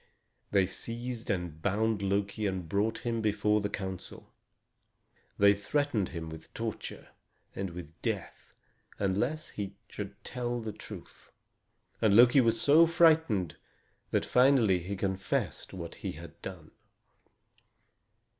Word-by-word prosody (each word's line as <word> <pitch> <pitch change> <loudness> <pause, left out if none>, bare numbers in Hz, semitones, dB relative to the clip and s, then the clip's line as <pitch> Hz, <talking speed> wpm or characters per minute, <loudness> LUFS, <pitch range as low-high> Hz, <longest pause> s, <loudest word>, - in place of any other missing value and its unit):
They 100 -2 +4
seized 120 +5 -5
and 90 -5 -2
bound 105 +2 +1
Loki 100 +2 0
and 95 -3 -3
brought 105 +7 -1
him 115 -1 0
before 105 0 +2
the 100 - -1
council. 95 -2 -6 1.0
They 100 0 +7
threatened 110 0 0
him 85 -3 -5
with 80 0 -10
torture - - -5 0.5
and 95 -1 -2
with 85 -2 -8
death - - -4 0.4
unless 105 +11 -1
he 100 -1 -5
should 100 -1 -6
tell 120 -1 -3
the 110 -2 -5
truth. - - -11 0.7
And 105 -3 +4
Loki 125 +4 +8
was 115 -2 +2
so 155 +6 +6
frightened 160 - +3 0.5
that - - +1
finally 125 -7 +4
he 95 +4 -4
confessed 95 -1 -2
what 85 -3 -6
he - - -5
had - - -11
done. - - -8
100 Hz, 125 wpm, -30 LUFS, 95-120 Hz, 1.0 s, Loki